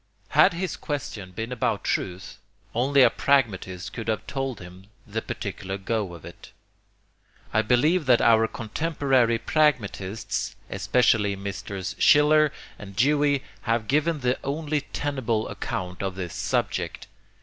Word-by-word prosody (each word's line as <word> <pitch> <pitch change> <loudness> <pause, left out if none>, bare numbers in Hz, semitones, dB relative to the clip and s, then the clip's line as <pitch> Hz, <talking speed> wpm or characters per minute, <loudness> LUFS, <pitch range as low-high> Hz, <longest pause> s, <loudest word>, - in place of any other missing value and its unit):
Had - - +5
his 175 0 -3
question 140 -10 -5
been 110 +6 -5
about 125 - -1
truth, 90 +1 -3 0.3
only 135 +3 +4
a - - +6
pragmatist 100 -10 0
could 115 -1 -6
have 110 -2 -1
told 135 -2 -3
him 90 +2 -12 0.2
the - - -3
particular 95 +1 -5
go 100 -2 -2
of 85 - -12
it. - - -12 1.0
I 110 - +4
believe 145 - +2
that 125 -2 +6
our 115 -1 +5
contemporary 130 0 +1
pragmatists, 115 -9 0 0.2
especially 110 -5 +2
Messrs. 100 -1 -5
Schiller 150 0 +5 0.3
and 100 -1 -10
Dewey, 145 +3 +2 0.3
have 115 -1 +1
given 150 +2 +1
the 125 +1 +1
only 150 +1 -1
tenable 125 -7 -1
account 90 -5 -5
of 95 -1 -3
this 90 -3 -5
subject. - - -2
115 Hz, 130 wpm, -25 LUFS, 100-145 Hz, 1.0 s, a